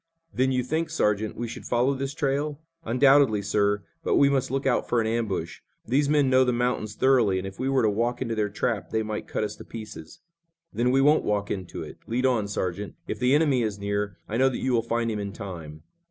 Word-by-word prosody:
"Then 130 +1 +2
you 125 -1 +1
think, 160 +6 -1
Sergeant, 105 -9 0
we 120 - -4
should 115 - -8
follow 125 +3 +2
this 135 +1 -4
trail?" 145 0 -1 0.2
"Undoubtedly, 135 -5 +4
sir, 100 0 +1 0.2
but - - +1
we 140 - +5
must 135 -2 0
look 135 +1 -2
out 130 -3 +1
for 120 - +2
an 110 - +1
ambush. 110 -7 -2 0.3
These 140 +5 +1
men 145 -2 +3
know 130 0 +5
the 125 - +1
mountains 120 -3 -1
thoroughly, 120 -8 +3
and 95 - -3
if 95 0 -8
we 130 - 0
were 135 -2 +2
to 110 - +4
walk 120 +4 -1
into 115 -3 -2
their 105 -2 0
trap 105 +1 -2
they 110 0 0
might 110 -1 -4
cut - - -2
us 105 0 -3
to - - -10
pieces." 110 -8 -10 0.5
"Then 120 +4 +1
we 135 +2 +3
won't 150 +3 +4
walk 100 -1 -1
into 95 -3 -5
it. - - -11
Lead 125 +3 0
on, 120 -6 +2
Sergeant. 100 0 -3
If - - -4
the 125 +2 +3
enemy 145 -5 +3
is 105 -3 -2
near, 100 -1 -2
I 110 - -2
know 135 +1 +4
that 130 - -4
you 130 - -1
will 115 - +3
find 115 0 -1
him 105 - -3
in 100 -1 -4
time." 85 -8 -8
115 Hz, 235 wpm, -26 LUFS, 105-130 Hz, 0.5 s, we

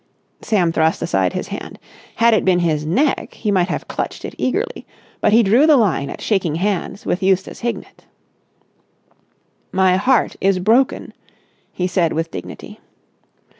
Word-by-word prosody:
Sam 180 -6 +1
thrust 160 0 +1
aside 95 -2 0
his - - -4
hand. - - -7 0.4
Had 230 0 +4
it 220 - +2
been 185 -2 +3
his 155 -3 0
neck 265 - 0
he 210 - -2
might 185 -3 +2
have - - -4
clutched - - -4
it - - -7
eagerly, 450 - -2 0.3
but - - +2
he 230 +2 +5
drew 235 +10 +4
the 305 -3 +6
line 180 - +1
at - - -8
shaking 185 -7 0
hands 195 +2 -2
with 180 - -1
Eustace 190 0 0
Hignett. 235 0 -6 1.6
"My 190 -1 +3
heart 250 +5 +2
is 195 -1 +2
broken," 225 +8 +1 0.6
he 180 - -3
said 175 -2 0
with 165 +1 -3
dignity. 90 - -9
190 Hz, 155 wpm, -19 LUFS, 175-230 Hz, 1.6 s, the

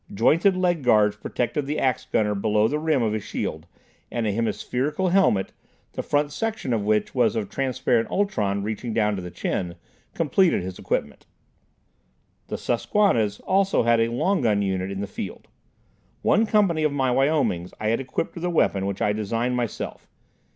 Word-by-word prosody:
Jointed 165 - +3
leg 175 -3 +1
guards 105 -5 +4
protected 135 +3 -2
the 150 +2 -2
ax 130 -3 0
gunner 105 -1 +1
below 105 +1 +2
the 150 +5 -1
rim 155 -5 +1
of 110 -2 0
his 110 -2 -3
shield, 80 +2 -4 0.4
and 120 -2 -2
a 105 - +1
hemispherical 125 - -1
helmet, 175 - +2 0.4
the - - -3
front 145 0 0
section 220 - -2
of 110 - +1
which 105 0 +1
was 120 -4 +2
of 105 -3 -2
transparent 130 -3 0
ultron 105 - 0
reaching 110 +2 -4
down 105 -1 +2
to 95 - -4
the 90 - -6
chin, 85 0 -3 0.4
completed 165 - +2
his 90 0 -7
equipment. 75 - -3 1.2
The - - -4
Susquannas 115 - +1
also 195 -4 +2
had 115 0 +3
a 115 - +3
long 160 +12 0
gun 105 -4 +2
unit 95 -1 -1
in 100 0 -4
the - - -2
field. 100 -2 -7 0.8
One 220 +3 +3
company 200 -7 +2
of 155 -1 +2
my 135 -3 +1
Wyomings 135 - +1
I 110 - 0
had 115 - +1
equipped 135 +4 -3
with 170 - -8
a 180 - 0
weapon 100 - +1
which 100 -1 -2
I 105 - +2
designed 115 +4 -1
myself. 120 -3 -4
120 Hz, 175 wpm, -24 LUFS, 105-150 Hz, 1.2 s, guards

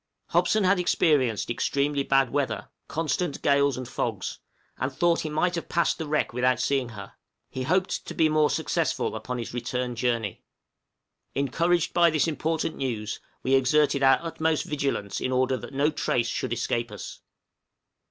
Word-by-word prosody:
Hobson 215 -1 +2
had 185 0 +3
experienced 135 - +2
extremely 140 +3 0
bad 135 -2 +2
weather 140 -1 -2 0.2
constant 165 +1 -1
gales 140 -1 +3
and 130 -1 -5
fogs - - -3 0.4
and 130 +2 -1
thought 170 +5 +2
he 155 - -3
might 165 +4 +1
have 170 - -4
passed 170 +1 +1
the 160 - -3
wreck 150 -4 0
without 125 0 +2
seeing 130 0 0
her; 100 -4 -9 0.4
he 130 - -4
hoped 185 +8 0
to - - -6
be 160 - +4
more 155 -1 +3
successful - - -1
upon 125 0 -4
his 120 -1 -5
return 125 0 -2
journey. 115 -5 -1 0.9
Encouraged 170 +5 +1
by 170 -1 +5
this 155 -1 +1
important 160 0 -1
news, 110 -5 -3 0.2
we 130 - +1
exerted 140 +2 +3
our 135 0 +6
utmost 160 -1 0
vigilance 140 -9 -2
in 130 - -1
order 130 +1 +2
that - - -8
no 140 +3 +1
trace 120 -5 0
should - - -3
escape 120 -1 -1
us. 105 - -8
140 Hz, 160 wpm, -26 LUFS, 125-160 Hz, 0.9 s, our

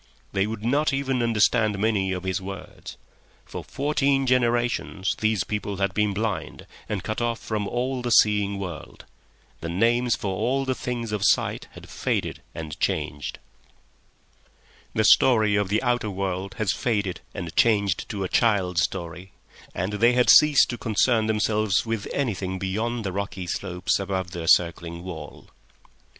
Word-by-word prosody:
They 100 +1 +1
would 110 0 -5
not 140 +4 +2
even 135 -2 -1
understand 110 -2 +2
many 100 -2 +1
of 90 -1 -3
his 95 0 -2
words. 95 0 -9 0.5
For - - -7
fourteen 140 -1 0
generations 120 -5 +1
these 110 -3 +1
people 105 -2 -4
had 100 -1 0
been 105 0 +1
blind 100 -6 -3 0.2
and 100 -3 -3
cut 110 +2 -3
off 120 -1 0
from 105 -3 -3
all 125 +3 -2
the 120 - -2
seeing 105 -3 +4
world; 90 -5 -8 0.5
the 85 - -5
names 120 +6 +2
for 95 -2 -3
all 135 +7 0
the 130 - 0
things 120 -3 -4
of 105 -2 -2
sight - - +1
had - - -12
faded - - -2
and 80 -2 -7
changed; 75 -1 -2 1.6
the - - +2
story 110 -5 +5
of 100 -2 0
the 110 +5 +1
outer 120 -3 0
world 95 0 -3
was 105 -4 +1
faded 100 -7 -1
and 85 -2 -6
changed 100 -5 +2
to 100 -3 -3
a - - -1
child's 95 -6 +2
story; 90 0 -4 0.4
and 95 +4 -2
they 115 +4 +4
had 125 0 +5
ceased 150 -2 +7
to 120 - -6
concern 110 0 +2
themselves 105 -2 +1
with 115 -3 -3
anything 95 -8 -2
beyond 110 +5 -2
the 95 - -2
rocky 100 -1 -4
slopes 90 +1 -1
above 95 -2 -3
their 85 -2 -5
circling 85 0 +2
wall. 90 -4 -9
105 Hz, 155 wpm, -25 LUFS, 95-120 Hz, 1.6 s, ceased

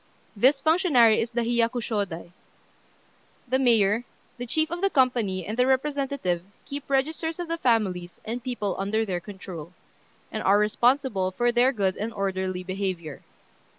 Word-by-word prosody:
This 260 +7 +4
functionary 310 - +4
is 230 - -2
the 240 0 -1
Hiyakushôdai. 230 -7 -1 1.2
The 260 +2 +1
mayor, 225 -3 +3 0.4
the 245 - -4
chief 315 +5 0
of 345 +1 -4
the 395 - +3
company, 235 - +1
and 215 - -4
the 250 +1 +2
representative 265 - 0 0.2
keep 280 0 -7
registers 315 +4 0
of 350 -1 -4
the 335 0 -3
families 190 - 0
and 235 +2 -4
people 215 -7 -2
under 215 +3 0
their 185 -4 -2
control, 180 -3 -9 0.6
and - - -3
are 195 +2 +4
responsible 215 -1 +2
for 240 +6 +1
their 245 +2 +4
good 195 -7 -1
and 220 +3 -3
orderly 190 -2 -2
behaviour. 185 -5 -4
230 Hz, 150 wpm, -26 LUFS, 190-265 Hz, 1.2 s, This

